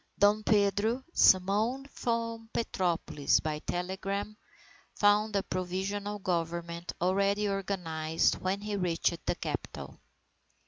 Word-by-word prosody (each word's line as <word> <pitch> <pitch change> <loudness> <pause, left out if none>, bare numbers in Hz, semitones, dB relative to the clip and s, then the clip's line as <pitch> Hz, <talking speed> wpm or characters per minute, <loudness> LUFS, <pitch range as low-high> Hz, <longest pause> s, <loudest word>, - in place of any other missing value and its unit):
Dom 205 +1 +4
Pedro, 210 +4 +2
summoned 210 +8 +4
from 230 -1 -2
Petropolis 175 -9 +1
by 155 -1 -3
telegram, 195 +5 -3 0.6
found 205 +1 +3
a 195 - +2
Provisional 195 +3 -3
Government 170 -2 -3
already 200 +3 +2
organized 175 -5 0
when 190 +2 -1
he 210 0 -3
reached 175 -2 0
the - - +1
capital. - - -6
195 Hz, 100 wpm, -30 LUFS, 175-210 Hz, 0.6 s, Dom